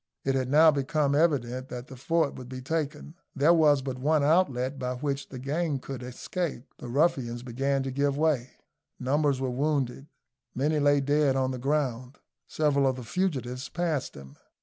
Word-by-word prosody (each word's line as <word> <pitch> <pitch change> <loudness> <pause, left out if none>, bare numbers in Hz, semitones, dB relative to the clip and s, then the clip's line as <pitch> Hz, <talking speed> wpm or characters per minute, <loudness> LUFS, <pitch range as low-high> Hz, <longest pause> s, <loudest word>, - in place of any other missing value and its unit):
It 135 - +1
had 130 -1 -1
now 155 +3 +7
become 145 0 0
evident 130 -5 +1
that 125 0 -6
the 130 - -11
fort 160 +4 0
would 125 -1 -10
be 130 0 -6
taken; 150 +2 -3 0.2
there 150 +4 +5
was 150 -4 +4
but 130 -1 -4
one 150 +2 +2
outlet 140 -5 +2
by 125 -1 -2
which 140 +1 -3
the 130 - -8
gang 145 +3 -1
could 130 -1 -7
escape; 130 +3 -4
the - - -8
ruffians 125 -4 +1
began 135 +3 -1
to 135 - -3
give 140 +1 0
way. 145 -5 +1 0.5
Numbers 140 +1 +1
were 130 -1 -1
wounded; 135 -1 -1 0.5
many 150 +4 +1
lay 145 -1 +4
dead 145 0 +2
on 130 -1 +1
the 130 - -5
ground. 130 -2 -1 0.3
Several 140 -3 +2
of 130 - +1
the 125 - -7
fugitives 130 -4 -2
passed 165 -5 -2
him. 70 -1 -12
140 Hz, 175 wpm, -28 LUFS, 130-150 Hz, 0.5 s, now